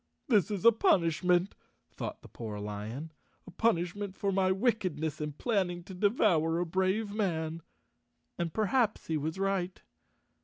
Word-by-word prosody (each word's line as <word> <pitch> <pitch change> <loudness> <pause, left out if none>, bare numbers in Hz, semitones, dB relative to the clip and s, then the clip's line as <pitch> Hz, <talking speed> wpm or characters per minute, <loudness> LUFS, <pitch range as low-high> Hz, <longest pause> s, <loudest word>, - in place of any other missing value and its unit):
"This 215 -4 +4
is 205 0 -3
a 230 - +10
punishment," 180 -3 +2 0.4
thought - - -6
the - - -11
poor 110 -3 -6
lion, 105 +9 -5 0.3
"a - - -11
punishment 190 0 0
for 200 0 -1
my 190 -1 +2
wickedness 185 - 0
in 150 -1 -3
planning 180 - -1
to 190 - -10
devour 180 -5 +2
a 175 - 0
brave 190 +4 0
man." 165 -6 -1 0.7
And 170 -1 -2
perhaps 220 +3 +1
he 160 - -1
was 155 +3 -2
right. 190 -2 -1
185 Hz, 145 wpm, -31 LUFS, 160-205 Hz, 0.7 s, a